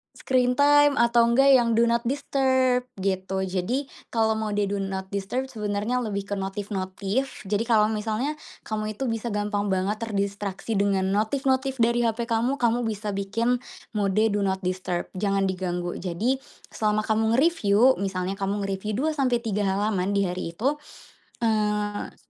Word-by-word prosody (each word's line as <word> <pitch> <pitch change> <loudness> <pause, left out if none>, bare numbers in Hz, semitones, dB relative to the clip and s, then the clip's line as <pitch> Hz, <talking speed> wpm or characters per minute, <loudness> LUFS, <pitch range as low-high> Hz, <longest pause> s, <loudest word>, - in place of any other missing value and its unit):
Screen 250 -1 +1
time 290 +1 +5
atau 235 -2 +4
enggak 270 +4 +5
yang 235 -3 +4
do 230 - +4
not 235 0 +3
disturb 260 -2 +1
gitu. 190 0 -1
Jadi 190 +9 -1 0.2
kalau 225 -1 +1
mode 215 -2 -1
do 200 0 -1
not 190 -1 -4
disturb 225 +7 -3
sebenarnya 210 +2 -1
lebih 205 -4 -2
ke 205 +1 -4
notif-notif, 195 +5 -3
jadi 205 +2 0
kalau 215 -2 +4
misalnya 220 +6 -1 0.3
kamu 215 0 -3
itu 255 0 -2
bisa 225 +1 -3
gampang 205 -1 -1
banget 195 +2 0
terdistraksi 200 -2 -3
dengan 200 -1 +2
notif-notif 265 +5 +1
dari 235 0 +2
HP 230 +1 -3
kamu, 235 +4 +1
kamu 240 -2 +1
bisa 210 -1 -3
bikin 225 +5 0 0.3
mode 210 -1 +1
do 205 - 0
not 190 -1 -1
disturb, 180 -1 -2 0.2
jangan 195 -1 +1
diganggu. 180 -2 -2
Jadi 205 +9 -1 0.3
selama 215 0 0
kamu 220 +1 +1
nge-review, 260 -5 +4
misalnya 190 0 -2
kamu 200 +1 -1
ngereview 195 +2 -3
2-3 240 -7 0
halaman 200 0 0
di 200 - +3
hari 180 -2 -3
itu, 275 - 0 0.6
eee, 210 -2 0
215 Hz, 150 wpm, -25 LUFS, 195-240 Hz, 0.6 s, time